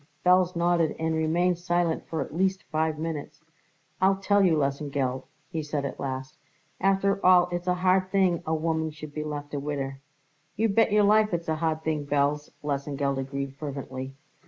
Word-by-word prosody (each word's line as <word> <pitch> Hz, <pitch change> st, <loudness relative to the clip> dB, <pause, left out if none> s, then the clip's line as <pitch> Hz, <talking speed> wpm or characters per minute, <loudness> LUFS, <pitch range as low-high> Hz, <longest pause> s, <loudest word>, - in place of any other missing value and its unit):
Belz 180 Hz, 0 st, +4 dB
nodded 170 Hz, -1 st, +2 dB
and 160 Hz, 0 st, -1 dB
remained 170 Hz, +3 st, +1 dB
silent 175 Hz, -2 st, 0 dB
for 160 Hz, -, -2 dB
at -, -, -5 dB
least 190 Hz, +1 st, +1 dB
five 155 Hz, 0 st, 0 dB
minutes. 155 Hz, -1 st, -5 dB, 0.6 s
"I'll 190 Hz, +1 st, +5 dB
tell 200 Hz, +1 st, +2 dB
you, 170 Hz, -4 st, +4 dB
Lesengeld," 140 Hz, -2 st, -1 dB, 0.3 s
he 160 Hz, -3 st, -2 dB
said 150 Hz, -1 st, -3 dB
at -, -, -5 dB
last, 130 Hz, -1 st, -5 dB, 0.4 s
"after 195 Hz, +1 st, +2 dB
all 180 Hz, -1 st, +6 dB
it's 175 Hz, +1 st, -3 dB
a 180 Hz, -, +3 dB
hard 185 Hz, +1 st, +2 dB
thing 185 Hz, -3 st, +2 dB
a 160 Hz, -, +1 dB
woman 160 Hz, 0 st, -1 dB
should 150 Hz, -1 st, -10 dB
be 150 Hz, -, -3 dB
left 145 Hz, -1 st, -6 dB
a 145 Hz, -, -1 dB
widder." 140 Hz, -2 st, -4 dB, 0.6 s
"You 225 Hz, +2 st, +1 dB
bet 225 Hz, +2 st, +3 dB
your 210 Hz, 0 st, +4 dB
life 210 Hz, -1 st, +4 dB
it's 170 Hz, -1 st, -4 dB
a 160 Hz, -, 0 dB
hard 160 Hz, -1 st, -1 dB
thing, 155 Hz, -2 st, -2 dB
Belz!" 145 Hz, +1 st, +1 dB
Lesengeld 140 Hz, -1 st, -1 dB
agreed 135 Hz, 0 st, -4 dB
fervently. 135 Hz, -2 st, -6 dB
160 Hz, 180 wpm, -27 LUFS, 145-180 Hz, 0.6 s, all